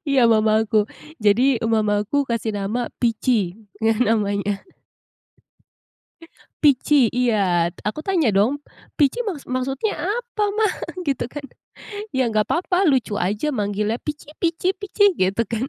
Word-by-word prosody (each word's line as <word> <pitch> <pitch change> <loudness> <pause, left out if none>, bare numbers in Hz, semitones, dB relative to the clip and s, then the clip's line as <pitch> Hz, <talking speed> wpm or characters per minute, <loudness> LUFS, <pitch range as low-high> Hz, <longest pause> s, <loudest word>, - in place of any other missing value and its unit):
iya 275 -2 +3
mamaku. 220 0 +2 0.5
Jadi, 205 +3 +4 0.3
mamaku 210 +2 0
kasih 230 -1 -1
nama 205 +5 -2 0.2
Pici 225 -5 +1 0.3
ngeh 220 -1 +2
namanya. 205 -2 +1 2.1
Pici 280 -3 +4
iya. 200 -9 +2 0.2
Aku 210 +8 -3
tanya 320 - +1
dong 205 +8 +2 0.4
"Pici 295 - +2
maksud 310 -10 -5
maksudnya 270 +9 -2
apa 430 +5 -2
Mah?" 430 -3 +2 0.3
Gitu 275 -6 -1
kan. 290 +3 -8 0.7
"Iya 250 -3 +1
nggak 215 -1 +1
papa, 360 +1 +1
lucu 260 -6 +1
aja 210 +11 -1
manggilnya 210 0 -1
Pici 300 0 -7
Pici 340 +2 +1
Pici," 405 +1 +2
gitu 195 - 0
kan. 235 +4 -3
240 Hz, 120 wpm, -22 LUFS, 210-300 Hz, 2.1 s, Jadi